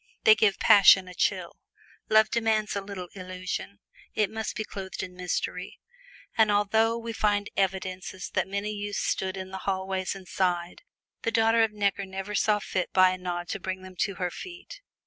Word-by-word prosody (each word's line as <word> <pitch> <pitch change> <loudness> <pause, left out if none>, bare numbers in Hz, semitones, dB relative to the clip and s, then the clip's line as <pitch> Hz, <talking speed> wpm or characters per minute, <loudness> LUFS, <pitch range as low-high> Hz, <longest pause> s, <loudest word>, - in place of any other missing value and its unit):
They 220 - +9
give 215 -2 +2
passion 195 -2 +7
a 180 - -9
chill. - - -1 0.5
Love 215 0 +5
demands 220 -3 +1
a 200 - -1
little 195 -3 -7
illusion; 185 +1 -5 0.4
it 210 -3 +1
must 220 0 -4
be 220 - -2
clothed 195 -2 -6
in 180 - -7
mystery. 180 -1 -3 0.6
And 220 -1 +4
although 220 +3 +2
we 230 0 -5
find 205 -2 0
evidences 185 -1 -2
that 185 0 0
many 200 +2 -2
youths 205 -1 -4
stood 190 0 -1
in 190 0 -6
the 190 - -5
hallways 190 0 -2
and 190 -2 -11
sighed, 175 -2 -1 0.4
the - - 0
daughter 225 0 +3
of 225 -1 +3
Necker 200 -1 -1
never 190 +2 -5
saw 210 +1 +3
fit 185 -3 -3
by 185 -1 +6
a 185 - -3
nod 175 -1 -4
to 200 - -3
bring 185 0 -4
them 185 0 -11
to 200 - 0
her 180 0 -2
feet. 375 - -10
195 Hz, 185 wpm, -27 LUFS, 185-215 Hz, 0.6 s, They